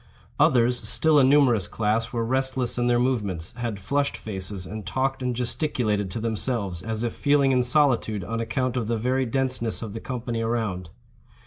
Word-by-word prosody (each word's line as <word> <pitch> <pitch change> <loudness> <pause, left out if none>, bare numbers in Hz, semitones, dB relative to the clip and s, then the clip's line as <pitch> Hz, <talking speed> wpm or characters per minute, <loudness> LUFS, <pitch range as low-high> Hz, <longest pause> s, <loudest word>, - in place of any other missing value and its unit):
Others, 120 0 +3
still 155 -2 +4
a - - +5
numerous 130 -8 +4
class, 110 +3 -1
were 115 -2 -1
restless 130 0 0
in 120 - +1
their 120 0 +3
movements, 105 -9 0
had 115 -4 -3
flushed 140 +8 -1
faces, 95 -2 -4
and 110 +2 -7
talked 130 +7 -1
and 125 -1 -1
gesticulated 120 -5 -1
to 90 - -3
themselves, 110 -5 -2
as 110 +2 -3
if 120 - -2
feeling 140 -1 +2
in 125 -1 +3
solitude 125 -6 +2
on 115 +6 -4
account 130 +2 -1
of 120 -4 -1
the 115 0 0
very 130 +3 0
denseness 125 -3 -1
of 105 -3 -6
the 115 - -5
company 120 -2 -4
around. 110 -6 -2
120 Hz, 180 wpm, -25 LUFS, 110-130 Hz, -, a